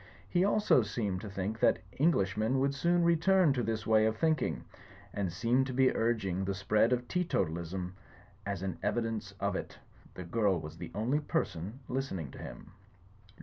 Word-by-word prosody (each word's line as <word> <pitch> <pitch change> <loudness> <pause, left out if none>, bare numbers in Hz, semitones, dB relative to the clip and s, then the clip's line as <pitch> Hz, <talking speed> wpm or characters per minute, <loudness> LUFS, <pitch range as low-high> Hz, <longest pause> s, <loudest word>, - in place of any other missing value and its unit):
He 180 0 +2
also 205 -8 +4
seemed 100 -3 -2
to 105 - -7
think 100 +3 -3
that - - +4 0.2
Englishmen 110 - +2
would 140 +1 +1
soon 170 +5 +2
return 170 -1 +4
to 125 - -1
this 110 -1 -2
way 110 0 +4
of 110 0 -1
think 155 -2 +2
ing; 75 - -2 0.5
and 100 -3 -1
seemed 120 +9 +1
to 130 - -4
be 130 +1 +3
urging 105 -5 0
the 95 0 -2
spread 105 +4 +2
of 125 -1 0
teetotalism 90 - -2 0.5
as 100 -2 -4
an 95 -4 -3
evidence 115 -2 -2
of - - -1
it. - - -5 0.4
The 90 - -6
girl 100 0 +1
was 75 +1 -8
the 85 -1 -6
only 120 +8 +1
person 110 - -3
listening 110 - -3
to - - -11
him. - - -9
110 Hz, 175 wpm, -31 LUFS, 95-135 Hz, 0.5 s, also